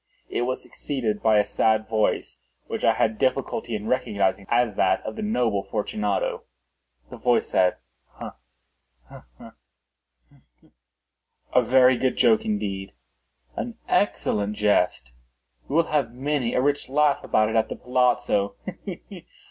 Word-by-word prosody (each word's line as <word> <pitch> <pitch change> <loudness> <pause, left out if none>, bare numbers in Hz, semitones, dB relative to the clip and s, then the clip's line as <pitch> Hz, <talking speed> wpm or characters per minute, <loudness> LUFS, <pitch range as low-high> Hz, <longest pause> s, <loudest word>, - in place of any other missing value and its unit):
It - - -2
was 130 - -3
succeeded 115 -7 -3
by 110 -1 +4
a 105 - +3
sad 110 0 +1
voice, 110 -1 -1 0.3
which - - -5
I - - +5
had 110 -1 0
difficulty 130 -3 -1
in 105 +1 -5
recognising 105 -5 0
as 120 -2 +2
that 95 -1 +2
of - - -6
the 220 - -5
noble 120 - 0
Fortunato. 105 +1 -2 0.7
The - - -8
voice - - +1
said— 90 -1 +3 0.4
"Ha! - - -9 0.7
ha! - - -13
ha!—he! - - -21 0.2
he!—a 125 - -6
very 130 +1 +5
good 130 - 0
joke 220 -1 +4
indeed—an 95 - -6
excellent 105 0 0
jest. 100 - +1 0.6
We 140 - -4
will 165 - +5
have 140 -6 +1
many 135 -2 -1
a - - +3
rich 145 -2 0
laugh 145 +1 +2
about 110 0 +2
it 110 - -3
at 110 0 +2
the - - -4
palazzo—he! 125 -5 -2
110 Hz, 135 wpm, -24 LUFS, 100-130 Hz, 0.7 s, I